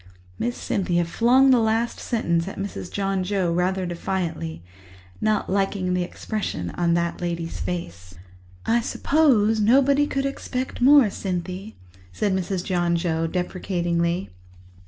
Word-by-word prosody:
Miss 240 +1 -2
Cynthia 175 -3 0
flung 250 +9 +4
the 250 - +5
last 225 +1 0
sentence 170 -7 0
at 195 - -7
Mrs. 195 -2 -5
John 195 -1 -1
Joe 185 -3 0
rather 185 +2 0
defiantly, 170 - -3 0.6
not 215 -1 +1
liking 195 -1 0
the 180 - +1
expression 180 - -4
on 170 -1 +1
that 170 0 -1
lady's 170 -1 -3
face. 90 - -5 0.5
"I 235 +1 +2
suppose 230 -5 +2
nobody 275 +6 +4
could 275 -1 -1
expect 260 -2 -4
more, 270 -4 +6
Cynthy," 185 +3 -4 0.4
said 195 - 0
Mrs. 190 -1 -2
John 175 -2 +1
Joe 165 -1 0
deprecatingly. 175 - -1
190 Hz, 130 wpm, -24 LUFS, 170-220 Hz, 0.6 s, more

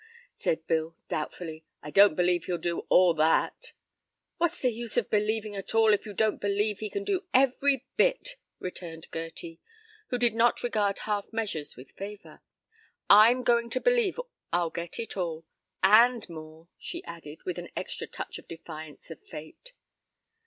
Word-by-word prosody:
said 160 0 -1
Bill, 160 0 0
doubtfully, 160 +1 -4 0.2
"I 150 - -7
don't 200 -3 +7
believe 180 0 +2
he'll 180 - -1
do 170 0 -3
all 180 -2 +6
that." 160 - +1 0.6
"What's 345 0 +1
the 250 - +2
use 235 0 -4
of 240 - +1
believing 215 0 0
at 195 +2 -5
all 220 -1 +6
if 210 - 0
you 205 - -6
don't 220 +1 +1
believe 205 +1 0
he 215 - -4
can 400 - -3
do 390 -2 -1
every 270 0 +3
bit?" - - +2 0.2
returned 170 -3 -7
Gerty, 165 0 -6 0.5
who 250 - -1
did 240 -2 +3
not 230 +1 +2
regard 210 -4 +1
half 210 -2 -2
measures 210 -10 -3
with 130 +2 -13
favor. 200 +1 -9 0.7
"I'm 230 +5 +7
goin' 235 -1 +2
to 255 - -1
believe 480 - +2 0.3
I'll 170 -1 +1
git 170 -1 -4
it 230 - -4
all 165 -3 -3 0.4
and 230 +5 +6
more," 160 -1 -11
she 345 +1 -6
added, 160 - -10
with 180 -1 -3
an 175 - -8
extra - - -4
touch - - -6
of - - -17
defiance 160 -1 -10
of 165 - -9
fate. 155 - -11
205 Hz, 165 wpm, -28 LUFS, 165-235 Hz, 0.7 s, don't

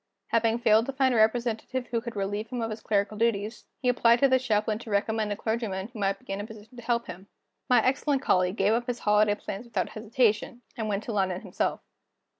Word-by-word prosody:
Having 230 0 +2
failed 225 -1 +4
to 275 - -3
find 265 -1 +2
a - - +2
representative 235 +3 +1
who 230 -1 0
could 235 -1 -7
relieve 205 +2 -2
him 245 +2 -5
of 225 -1 -2
his 215 - -6
clerical 205 0 0
duties, 220 -1 -1
he 255 - -3
applied 235 -1 +5
to 275 - +4
the 260 -1 +4
Chaplain 215 -3 0
to 235 - -10
recommend 215 +1 0
a - - 0
clergyman 220 -3 -3
who 235 -3 -10
might 195 -1 +1
be 195 - -7
in 195 - -3
a - - -5
position 220 +1 -13
to 240 - -9
help 235 0 0
him. 190 +3 -9 0.4
My 250 - +5
excellent 275 +1 +1
colleague 185 +1 +2
gave 200 +1 +2
up 240 +1 -1
his 245 -1 -2
holiday 210 -1 +3
plans 205 +2 -7
without 235 - -2
hesitation, 230 +1 0
and 220 -3 -3
went 205 +1 -1
to 235 - -5
London 190 -3 0
himself. - - -2
220 Hz, 230 wpm, -27 LUFS, 205-240 Hz, 0.4 s, applied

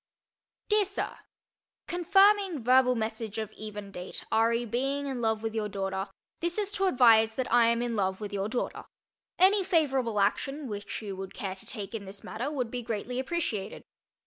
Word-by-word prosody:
DEAR 425 0 +4
SIR: 395 +1 -3 0.7
Confirming 385 - +3
verbal 250 +1 +5
message 220 -1 -3
of 220 -1 -3
even 210 -2 -8
date 180 -1 -6
re: 230 +2 +3
being 270 +5 -1
in 265 -3 -3
love 220 -1 0
with 225 -1 -2
your 215 -2 -1
daughter, 195 0 -3 0.3
this 345 +2 -1
is 410 -1 -1
to 390 -1 0
advise 225 -7 +5
that 255 -1 -2
I 240 -1 +6
am 235 +1 +2
in 240 -1 -2
love 190 -2 0
with 210 -1 -6
your 200 +1 -1
daughter. 240 - -3 0.5
Any 385 +2 +5
favorable 270 - +1
action 275 +8 0
which 205 0 -5
you 200 -2 -5
would 190 0 -7
care 195 -2 -3
to 190 - -13
take 210 -2 -6
in 215 -3 -5
this 195 +1 -10
matter 245 +6 -4
would 250 -6 -2
be 250 - -3
greatly 235 +2 -3
appreciated. 260 - -3
230 Hz, 180 wpm, -29 LUFS, 210-275 Hz, 0.7 s, I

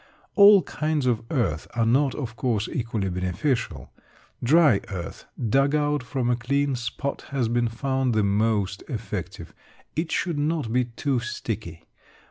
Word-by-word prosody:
All 200 -2 +8
kinds 155 -3 -1
of 120 -3 +1
earth 95 - -1
are 115 -1 +2
not, 130 +4 +2
of 125 -4 -5
course, 115 -3 0
equally 110 -4 -2
beneficial. 90 - -2 0.5
Dry 145 -4 +5
earth 90 -5 -6 0.2
dug 135 +5 +3
out 145 -1 +1
from 125 -1 -2
a - - +3
clean 140 +3 0
spot 125 +3 -4
has 135 -4 0
been 120 +1 +1
found 130 +1 -1
the 110 - +3
most 100 -2 +1
effective. 105 - -5 0.4
It 160 +1 -2
should 170 -6 -1
not 145 -6 -1
be 125 0 +3
too 125 +2 -1
sticky. 110 -8 -5
120 Hz, 145 wpm, -25 LUFS, 110-140 Hz, 0.5 s, All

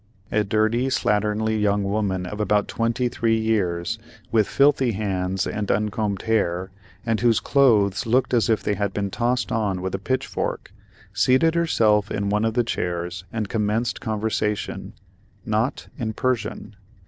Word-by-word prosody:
A 105 - +2
dirty 110 +5 +1
slatternly 110 -2 +1
young 100 -1 +2
woman 100 -2 -1
of 105 +4 -6
about 105 -1 +1
twenty 115 +2 0
three 115 -1 +1
years, 110 -2 0 0.3
with 110 -3 +3
filthy 135 -3 +3
hands 95 -3 -1
and 105 -1 -3
uncombed 105 -1 -1
hair, 95 -4 0 0.3
and 115 -2 +1
whose 120 -2 +4
clothes 115 -6 +3
looked 125 +3 +2
as 120 -1 +3
if 110 - +2
they 105 - 0
had 100 -1 -2
been 100 -1 -2
tossed 120 -1 0
on 105 -4 0
with 95 0 -4
a - - -2
pitchfork, 130 +1 -3 0.4
seated 130 +6 +3
herself 110 -12 +2
in 100 -1 -2
one 105 +2 +1
of 115 0 -1
the 120 - +3
chairs 90 -4 -3
and 110 -2 -2
commenced 110 +4 -1
conversation—not 110 +1 -3
in 110 -3 -2
Persian. 115 -4 -2
110 Hz, 150 wpm, -23 LUFS, 100-115 Hz, 0.4 s, whose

